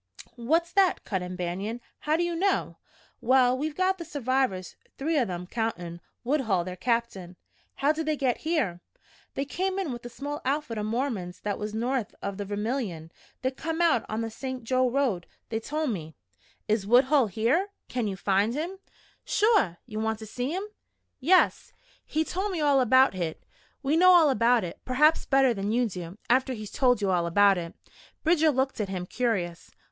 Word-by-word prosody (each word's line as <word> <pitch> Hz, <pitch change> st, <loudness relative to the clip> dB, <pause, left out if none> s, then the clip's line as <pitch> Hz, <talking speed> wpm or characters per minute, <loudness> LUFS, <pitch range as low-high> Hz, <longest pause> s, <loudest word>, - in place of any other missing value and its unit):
"What's 325 Hz, +9 st, +1 dB
that?" 390 Hz, -2 st, +3 dB
cut 190 Hz, -3 st, -2 dB
in 180 Hz, 0 st, -5 dB
Banion. 190 Hz, +6 st, -3 dB, 0.2 s
"How 305 Hz, +1 st, +1 dB
do 345 Hz, -, +1 dB
you 345 Hz, -1 st, -1 dB
know?" 385 Hz, +3 st, 0 dB, 0.4 s
"Well, 255 Hz, 0 st, +4 dB
we've 295 Hz, +3 st, -3 dB
got 375 Hz, 0 st, +1 dB
the -, -, -4 dB
survivors 260 Hz, -, -1 dB, 0.2 s
three 315 Hz, +4 st, -1 dB
o' 250 Hz, -, +2 dB
them, 180 Hz, -2 st, -5 dB
countin' 180 Hz, -6 st, -4 dB, 0.2 s
Woodhull, 235 Hz, -, +1 dB
their 180 Hz, +1 st, -6 dB
captain." 195 Hz, -4 st, -2 dB, 0.4 s
"How 280 Hz, +2 st, +2 dB
did 310 Hz, 0 st, -3 dB
they 310 Hz, -1 st, +1 dB
get 260 Hz, -3 st, +1 dB
here?" 300 Hz, -, -1 dB, 0.5 s
"They 275 Hz, -, -1 dB
came 375 Hz, +6 st, -2 dB
in 375 Hz, -8 st, -2 dB
with 240 Hz, -1 st, -7 dB
a 240 Hz, -, -7 dB
small 285 Hz, +5 st, -5 dB
outfit 270 Hz, -4 st, -1 dB
o' -, -, -2 dB
Mormons 215 Hz, -6 st, -3 dB
that 205 Hz, -1 st, -3 dB
was 210 Hz, 0 st, -4 dB
north 240 Hz, 0 st, -1 dB
o' 200 Hz, -, -1 dB
the 200 Hz, +1 st, -6 dB
Vermilion. 205 Hz, -, -3 dB, 0.3 s
They'd 260 Hz, +1 st, -1 dB
come 325 Hz, +1 st, -3 dB
out 330 Hz, -9 st, +3 dB
on 215 Hz, +1 st, -2 dB
the 225 Hz, 0 st, -3 dB
St. 260 Hz, +1 st, -6 dB
Jo 255 Hz, +2 st, +2 dB
road. 245 Hz, -9 st, 0 dB, 0.2 s
They 225 Hz, -, -1 dB
told 300 Hz, +3 st, -2 dB
me 160 Hz, -6 st, -6 dB, 0.3 s
" -, -, -34 dB
"Is 210 Hz, -2 st, 0 dB
Woodhull 260 Hz, +2 st, +5 dB
here 235 Hz, -, +1 dB, 0.2 s
can 240 Hz, -3 st, -2 dB
you 195 Hz, -, -3 dB
find 200 Hz, +4 st, +1 dB
him?" 345 Hz, +6 st, -4 dB, 0.4 s
"Shore! 420 Hz, -, +2 dB
Ye 215 Hz, -4 st, -7 dB
want 220 Hz, 0 st, -1 dB
to 220 Hz, -, -9 dB
see 245 Hz, +4 st, -3 dB
him?" 370 Hz, +5 st, -2 dB, 0.6 s
"Yes." 355 Hz, +8 st, +3 dB, 0.3 s
"He 315 Hz, +1 st, 0 dB
told 385 Hz, +5 st, -2 dB
me 345 Hz, -, -2 dB
all 285 Hz, -3 st, +4 dB
about 260 Hz, +1 st, +5 dB
hit 170 Hz, -4 st, -4 dB, 0.2 s
" -, -, -37 dB
"We 280 Hz, +3 st, +2 dB
know 365 Hz, +2 st, +7 dB
all 330 Hz, -5 st, +6 dB
about 235 Hz, -1 st, +3 dB
it, 170 Hz, -, -6 dB
perhaps 300 Hz, +5 st, +3 dB
better 270 Hz, -2 st, +4 dB
than 200 Hz, 0 st, -2 dB
you 240 Hz, +1 st, +2 dB
do 180 Hz, -2 st, -7 dB
after 260 Hz, +2 st, +2 dB
he's 215 Hz, -3 st, -7 dB
told 245 Hz, -5 st, +2 dB
you 195 Hz, -, +2 dB
all 175 Hz, -2 st, +1 dB
about 200 Hz, +2 st, +4 dB
it." 170 Hz, -1 st, -7 dB, 0.5 s
Bridger 320 Hz, -1 st, +4 dB
looked 265 Hz, -4 st, 0 dB
at 200 Hz, -, -3 dB
him, 185 Hz, -2 st, -3 dB
curious. 180 Hz, -7 st, -2 dB
245 Hz, 195 wpm, -27 LUFS, 200-295 Hz, 0.6 s, know